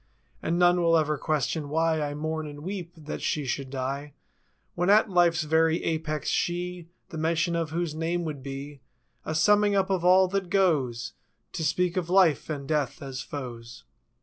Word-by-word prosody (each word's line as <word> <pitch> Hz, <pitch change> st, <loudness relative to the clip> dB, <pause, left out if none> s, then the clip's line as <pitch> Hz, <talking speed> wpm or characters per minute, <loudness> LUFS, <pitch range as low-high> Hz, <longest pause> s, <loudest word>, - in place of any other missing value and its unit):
And 165 Hz, +2 st, -1 dB
none 175 Hz, 0 st, +4 dB
will 165 Hz, -1 st, +4 dB
ever 155 Hz, -1 st, +1 dB
question 150 Hz, 0 st, -1 dB
why 160 Hz, +1 st, +1 dB
I 145 Hz, -1 st, -2 dB
mourn 155 Hz, +1 st, -3 dB
and 145 Hz, 0 st, -9 dB
weep. 180 Hz, 0 st, -5 dB
That 155 Hz, -1 st, -6 dB
she 150 Hz, -2 st, -1 dB
should 135 Hz, +1 st, -3 dB
die 135 Hz, +2 st, -4 dB, 0.6 s
When 175 Hz, +2 st, 0 dB
at 210 Hz, 0 st, +5 dB
life's 175 Hz, -2 st, +3 dB
very 160 Hz, +2 st, +2 dB
apex—she. 170 Hz, +2 st, -2 dB, 0.2 s
The 165 Hz, -, -7 dB
mention 170 Hz, +2 st, +1 dB
of 165 Hz, -2 st, -1 dB
whose 165 Hz, 0 st, -2 dB
name 165 Hz, +2 st, -2 dB
would 150 Hz, -4 st, -5 dB
be 140 Hz, +1 st, -7 dB, 0.4 s
A 155 Hz, -, -3 dB
summing 205 Hz, +5 st, +4 dB
up 195 Hz, 0 st, +1 dB
of 185 Hz, -3 st, 0 dB
all 185 Hz, +1 st, +6 dB
that 195 Hz, -1 st, -2 dB
goes 150 Hz, -, +1 dB, 0.4 s
To 160 Hz, -, -3 dB
speak 180 Hz, +4 st, 0 dB
of 175 Hz, -2 st, -1 dB
Life 180 Hz, -6 st, +3 dB
and 140 Hz, -3 st, -4 dB
Death 150 Hz, -5 st, -1 dB
as 135 Hz, -1 st, -5 dB
foes. 120 Hz, -3 st, -8 dB
160 Hz, 175 wpm, -27 LUFS, 145-175 Hz, 0.6 s, all